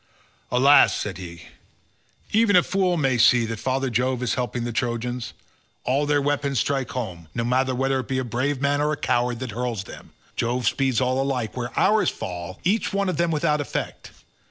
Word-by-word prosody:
"Alas," 135 +4 +5
said 95 -3 -4
he, 85 -1 -9 0.9
"even 215 -2 +4
a 180 - +6
fool 185 -2 +1
may 135 -5 +1
see 120 0 +5
that 115 -1 -5
father 130 +1 -1
Jove 125 +2 0
is 125 - 0
helping 125 -1 -2
the 120 - -3
Trojans. 120 0 -3 0.5
All 140 +3 +1
their 145 0 +3
weapons 140 -1 0
strike 135 0 -1
home; 90 -10 -5
no 115 - -1
matter 130 +2 +1
whether 135 +1 +1
it 130 - -5
be 130 - -1
a 130 - 0
brave 130 +4 -1
man 145 +1 +1
or 150 +1 +1
a 150 - -2
coward 120 -2 0
that 130 -3 -4
hurls 120 -2 -3
them, - - -12 0.2
Jove 120 +1 -1
speeds 130 -3 +1
all 130 +1 +1
alike, 130 -5 -2
whereas 120 -1 -4
ours 215 +1 +3
fall 90 +1 -6
each 205 +6 +1
one 200 -1 0
of 185 - -2
them 170 0 +1
without 150 -1 +1
effect. 145 - -5
130 Hz, 195 wpm, -24 LUFS, 120-145 Hz, 0.9 s, a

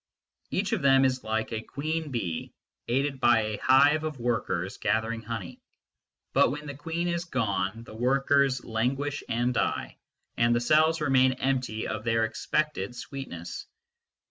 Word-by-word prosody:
Each - - -1
of - - 0
them 135 -1 +5
is 130 -1 0
like 110 +1 -2
a 110 -1 -2
queen 155 +6 -3
bee, 95 -11 -4 0.3
aided 135 +2 0
by 120 -3 +5
a 110 -1 -3
hive 145 +4 +5
of 155 -4 -4
workers 100 -6 -1
gathering 110 +1 0
honey; 110 -5 -6 0.7
but - - +5
when 150 +3 -5
the 145 - -5
queen 165 +4 -3
is 170 0 -1
gone 110 - -1
the 110 - -12
workers 135 +2 +2
languish 135 +6 -1
and 120 +2 +1
die, - - -2 0.4
and 120 0 +3
the - - +3
cells 155 +5 +3
remain 130 -2 +4
empty 130 -4 -1
of 110 -1 -4
their 115 -1 +2
expected 120 -1 -2
sweet 135 +2 -7
ness. 85 0 -7
125 Hz, 155 wpm, -28 LUFS, 110-140 Hz, 0.7 s, them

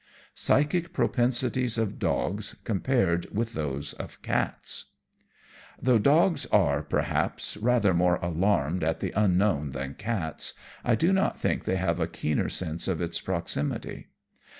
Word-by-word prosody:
Psychic 160 +5 +1
Propensities 125 -1 +1
of 110 -3 -1
Dogs 100 +2 -1
compared 95 -5 +1
with 115 +2 -2
those 70 -1 -3
of - - -9
Cats - - -2 0.9
Though 125 -2 +3
dogs 155 - +3
are, 75 -8 +3
perhaps, - - -1
rather 110 -4 +2
more 90 0 +3
alarmed 85 -1 0
at 80 +1 0
the - - -2
Unknown 95 -7 +2
than 70 0 -4
cats, 90 -9 -3 0.3
I 120 - +3
do 170 - +2
not 190 0 +1
think - - -1
they 95 - +1
have 90 -2 0
a 80 - +1
keener 75 - -1
sense 80 +1 -2
of 90 -4 0
its 85 -1 -2
proximity. - - -3
95 Hz, 135 wpm, -27 LUFS, 80-120 Hz, 0.9 s, Though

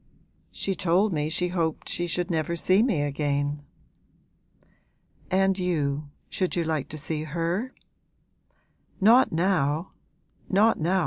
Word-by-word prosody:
'She 195 - -2
told 185 +3 +1
me 150 -1 -1
she 180 +2 0
hoped 165 -3 -2
she 175 - 0
should 175 +1 -1
never 160 +1 -1
see 185 +4 +3
me 220 - +1
again.' 145 0 -1 1.7
'And 190 +1 +2
you, 150 -5 -1 0.2
should 185 -2 -2
you 170 - +1
like 155 -4 -2
to 155 - -5
see 155 +1 -3
her?' 170 - -2 1.3
'Not 230 +6 +5
now 165 -2 0 0.6
not 210 +4 +3
now!' 180 +4 +1
170 Hz, 125 wpm, -26 LUFS, 150-190 Hz, 1.7 s, Not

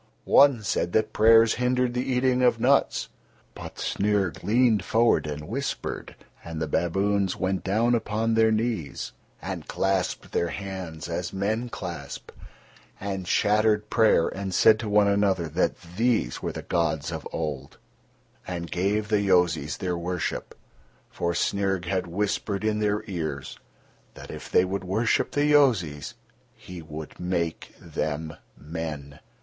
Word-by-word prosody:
One 135 -6 +5
said 85 -3 -1
that 110 0 +1
prayers 115 +1 +6
hindered 125 0 +1
the 125 - 0
eating 125 0 +2
of 125 -2 +3
nuts. - - +2 0.4
But - - -9
Snyrg 100 -3 0
leaned 110 0 +3
forward 115 -7 +2
and 75 0 -5
whispered, 135 +7 -4 0.3
and 80 -1 -6
the 80 - -2
baboons 95 +4 +1
went 95 0 -1
down 110 +5 +2
upon 115 0 0
their 110 0 +4
knees 110 - -2 0.3
and - - -5
clasped 95 -1 -1
their 85 - 0
hands 90 -4 -6
as 85 +1 -3
men 110 +5 -1
clasp, 85 - -7 0.7
and 95 -2 -4
chattered 105 +1 +2
prayer 110 -7 +4
and 95 -2 -4
said 110 +2 +6
to 110 -2 -4
one 105 0 +4
another 100 -4 +2
that 85 +5 0 0.2
these 115 - +1
were - - -2
the - - -7
gods 85 -4 -1
of - - -5
old, 70 -4 -4 0.7
and 85 -2 -5
gave 100 +4 0
the 105 -1 +2
Yozis 90 -4 +2
their 90 -2 -2
worship—for 85 0 -5
Snyrg 95 -1 0
had 90 0 -1
whispered 100 +2 -2
in 110 -1 +1
their 105 0 0
ears 80 - -5 0.6
that, - - -10
if - - -8
they 90 - +4
would 95 +1 -3
worship 110 +6 +1
the 145 0 +1
Yozis, 95 - +2 0.4
he 90 -2 -10
would 80 -1 -9
make 85 -2 -3
them 80 +1 -4 0.2
men. 75 -2 -6
95 Hz, 140 wpm, -26 LUFS, 85-110 Hz, 0.7 s, prayers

